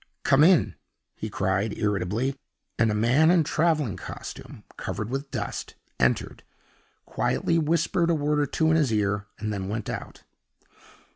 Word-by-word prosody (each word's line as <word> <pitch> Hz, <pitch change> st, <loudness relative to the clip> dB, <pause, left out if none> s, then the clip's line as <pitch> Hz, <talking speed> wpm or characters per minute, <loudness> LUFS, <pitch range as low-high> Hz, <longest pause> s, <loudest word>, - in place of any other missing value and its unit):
"Come 140 Hz, +1 st, +5 dB
in," 175 Hz, -1 st, +5 dB, 0.4 s
he 110 Hz, -, -5 dB
cried, 95 Hz, +2 st, -1 dB
irritably; 105 Hz, +5 st, -1 dB, 0.4 s
and 115 Hz, -, +4 dB
a 105 Hz, -, 0 dB
man 125 Hz, +9 st, +4 dB
in 175 Hz, -2 st, +5 dB
traveling 155 Hz, -, +1 dB
costume, -, -, -9 dB
covered 110 Hz, +2 st, -4 dB
with 135 Hz, +1 st, -3 dB
dust, 115 Hz, -7 st, -5 dB, 0.2 s
entered, 60 Hz, -1 st, +1 dB, 0.6 s
quietly 165 Hz, 0 st, 0 dB
whispered 165 Hz, +2 st, +1 dB
a 170 Hz, -, +3 dB
word 150 Hz, 0 st, 0 dB
or 145 Hz, -, +1 dB
two 160 Hz, +4 st, +1 dB
in 160 Hz, -, +4 dB
his 145 Hz, -7 st, +2 dB
ear, 105 Hz, -1 st, 0 dB
and 105 Hz, -1 st, -3 dB
then 95 Hz, -1 st, -4 dB
went 110 Hz, 0 st, -3 dB
out. -, -, -7 dB
125 Hz, 150 wpm, -26 LUFS, 105-155 Hz, 0.6 s, Come